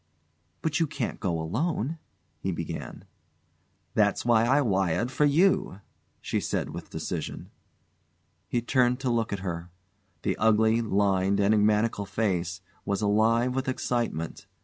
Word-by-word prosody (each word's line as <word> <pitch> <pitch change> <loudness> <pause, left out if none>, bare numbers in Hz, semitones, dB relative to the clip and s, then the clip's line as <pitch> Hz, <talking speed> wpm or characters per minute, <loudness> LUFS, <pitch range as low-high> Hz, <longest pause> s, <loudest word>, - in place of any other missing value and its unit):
"But 155 -2 0
you 165 - +2
can't 140 -4 -4
go 85 -5 -1
alone 150 - -1 0.2
" 80 -2 -43
he 95 - -1
began. 85 - -6 0.9
"That's - - +2
why 115 -1 +4
I 135 +4 +4
wired 95 - +1
for 150 +3 +2
you," 145 - +2 0.4
she - - -1
said - - -2
with - - -8
decision. - - -5 1.0
He 120 +4 -1
turned 125 0 +2
to 130 -2 0
look 115 -2 0
at 100 -2 -3
her. 85 -1 -4 0.5
The - - 0
ugly, 110 +1 +3
lined, 100 -2 +2
enigmatical 105 0 +2
face 90 -4 -1 0.2
was 100 +1 -1
alive 115 +4 +3
with 130 0 -1
excitement. 120 -10 -2
110 Hz, 135 wpm, -27 LUFS, 95-125 Hz, 1.0 s, why